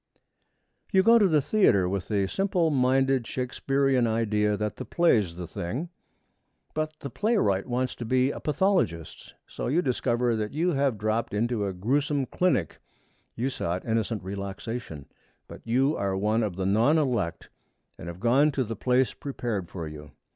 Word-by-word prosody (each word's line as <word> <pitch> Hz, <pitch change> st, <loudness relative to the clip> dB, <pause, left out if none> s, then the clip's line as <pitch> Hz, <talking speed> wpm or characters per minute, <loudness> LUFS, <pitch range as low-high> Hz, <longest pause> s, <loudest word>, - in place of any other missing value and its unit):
You 190 Hz, -1 st, +4 dB
go 230 Hz, +2 st, +6 dB
to 205 Hz, -, +5 dB
the 155 Hz, -5 st, +2 dB
theatre 100 Hz, -, +3 dB
with 95 Hz, -1 st, -3 dB
the 100 Hz, -3 st, +1 dB
simple 175 Hz, -, 0 dB
minded 135 Hz, -1 st, +2 dB
Shakespearean 135 Hz, 0 st, 0 dB
idea 105 Hz, -2 st, +1 dB
that 105 Hz, 0 st, -3 dB
the -, -, -5 dB
play's 110 Hz, -, +2 dB
the 90 Hz, 0 st, -6 dB
thing. 120 Hz, -, -4 dB, 0.8 s
But 155 Hz, 0 st, -2 dB
the 140 Hz, -, -6 dB
playwright 195 Hz, -, +1 dB
wants 125 Hz, +1 st, -1 dB
to 120 Hz, -, -5 dB
be 130 Hz, +3 st, +2 dB
a -, -, -6 dB
pathologist. 150 Hz, -, -1 dB
So -, -, -5 dB
you 165 Hz, +8 st, +1 dB
discover 120 Hz, -2 st, 0 dB
that 105 Hz, +1 st, -3 dB
you 170 Hz, +4 st, +1 dB
have 135 Hz, -6 st, +1 dB
dropped 110 Hz, +1 st, -1 dB
into 110 Hz, -1 st, 0 dB
a 95 Hz, -, -3 dB
grewsome 135 Hz, +8 st, 0 dB
clinic. 145 Hz, -, 0 dB, 0.6 s
You 130 Hz, +4 st, -1 dB
sought 90 Hz, -5 st, -3 dB
innocent 110 Hz, -2 st, -1 dB
relaxation, 100 Hz, -, -6 dB, 0.4 s
but -, -, -11 dB
you 135 Hz, +6 st, +2 dB
are 100 Hz, -1 st, -1 dB
one 105 Hz, +3 st, +1 dB
of 105 Hz, -5 st, -2 dB
the 95 Hz, 0 st, -2 dB
non 115 Hz, +11 st, +3 dB
elect 120 Hz, -, -1 dB, 0.5 s
and 85 Hz, -, -8 dB
have 85 Hz, +1 st, -7 dB
gone 135 Hz, +7 st, +3 dB
to 135 Hz, -, 0 dB
the 115 Hz, -1 st, -5 dB
place 125 Hz, +2 st, +1 dB
prepared 115 Hz, -, -4 dB
for 85 Hz, -3 st, -6 dB
you. 75 Hz, -1 st, -10 dB
120 Hz, 165 wpm, -27 LUFS, 100-140 Hz, 0.8 s, go